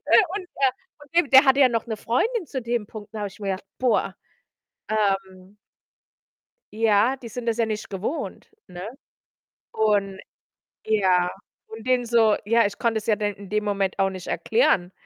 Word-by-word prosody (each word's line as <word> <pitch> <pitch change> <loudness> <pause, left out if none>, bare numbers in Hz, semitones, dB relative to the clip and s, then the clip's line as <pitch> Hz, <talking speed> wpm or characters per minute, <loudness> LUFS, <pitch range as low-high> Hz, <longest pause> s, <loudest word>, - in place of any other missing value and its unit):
Äh, - - +6
und, 405 - -4
äh, 270 -1 +3 0.3
von 290 -1 -16
dem 345 -5 +3
der 265 +1 +8
hatte 270 0 +4
ja 265 - +7
noch 230 -2 -1
'ne 220 -2 -3
Freundin 370 - -1
zu 260 -2 -5
dem 235 -2 -2
Punkt, 210 -1 -10
da 215 - -4
habe 205 - -2
ich 195 - -17
mir 200 -1 -2
gedacht: 185 - -11
„Boah, 220 -6 +1 0.8
ähm“ 195 -2 -1 1.2
„ja, 220 +4 +3
die 240 -2 -10
sind 240 +2 -6
das 230 -1 0
ja 230 -2 +1
nicht 215 -1 -5
gewohnt“, 200 - -4 0.2
ne? 180 +3 -8 0.8
Und 205 -3 +1 0.7
ja, 185 -5 +2 0.4
und 220 +2 -10
dem 255 -1 +3
so 230 -2 +3
ja, 230 +3 +3
ich 205 0 -3
konnte 230 -2 0
es 215 - -5
ja 220 - +3
dann 205 -1 -2
in 200 -1 -12
dem 210 0 0
Moment 200 -2 -1
auch 195 - +3
nicht 185 -2 -8
erklären, 190 - +1
215 Hz, 185 wpm, -24 LUFS, 200-240 Hz, 1.2 s, der